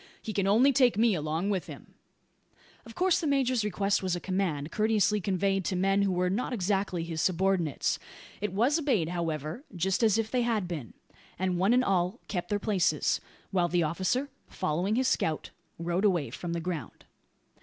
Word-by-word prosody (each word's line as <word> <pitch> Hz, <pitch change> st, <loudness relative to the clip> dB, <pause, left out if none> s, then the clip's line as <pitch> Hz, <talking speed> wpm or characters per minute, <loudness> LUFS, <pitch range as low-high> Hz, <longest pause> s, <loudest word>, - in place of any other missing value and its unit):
He 215 Hz, -, -6 dB
can 195 Hz, -1 st, 0 dB
only 245 Hz, +8 st, +5 dB
take 245 Hz, -5 st, +4 dB
me 225 Hz, 0 st, +4 dB
along 160 Hz, +4 st, -1 dB
with 190 Hz, -3 st, -2 dB
him." -, -, -11 dB, 0.9 s
Of 230 Hz, -, -12 dB
course 365 Hz, -1 st, +2 dB
the 320 Hz, -, -1 dB
major's 260 Hz, -4 st, +2 dB
request 200 Hz, -1 st, 0 dB
was 185 Hz, -2 st, 0 dB
a -, -, -3 dB
command, 175 Hz, -6 st, -2 dB
courteously 210 Hz, -1 st, +2 dB
conveyed, 195 Hz, +1 st, 0 dB
to 190 Hz, -, -1 dB
men 195 Hz, +2 st, +2 dB
who 200 Hz, -1 st, +2 dB
were 180 Hz, 0 st, +1 dB
not 215 Hz, +7 st, -1 dB
exactly 190 Hz, -4 st, 0 dB
his 165 Hz, -1 st, -3 dB
subordinates. 185 Hz, -4 st, +1 dB, 0.4 s
It 210 Hz, -, -1 dB
was 245 Hz, -, +2 dB
obeyed, 235 Hz, -, +1 dB
however, 165 Hz, -, -3 dB
just 190 Hz, +4 st, 0 dB
as 220 Hz, -2 st, +4 dB
if 225 Hz, -1 st, -1 dB
they 250 Hz, -, +2 dB
had 225 Hz, -6 st, 0 dB
been; 155 Hz, -10 st, -6 dB, 0.4 s
and 185 Hz, -1 st, -1 dB
one 195 Hz, +4 st, +3 dB
and 250 Hz, +1 st, +4 dB
all 185 Hz, -4 st, 0 dB
kept 180 Hz, -4 st, -3 dB
their 205 Hz, -, +1 dB
places, 190 Hz, -7 st, +1 dB, 0.3 s
while 180 Hz, -3 st, +2 dB
the 175 Hz, 0 st, +1 dB
officer, 190 Hz, -, 0 dB, 0.2 s
following 180 Hz, +8 st, -1 dB
his 255 Hz, +1 st, +2 dB
scout, 160 Hz, -9 st, -1 dB, 0.3 s
rode 170 Hz, +3 st, -1 dB
away 180 Hz, -8 st, +2 dB
from 175 Hz, -1 st, -5 dB
the 170 Hz, -, -1 dB
ground. 170 Hz, -2 st, -5 dB
190 Hz, 185 wpm, -29 LUFS, 175-215 Hz, 0.9 s, only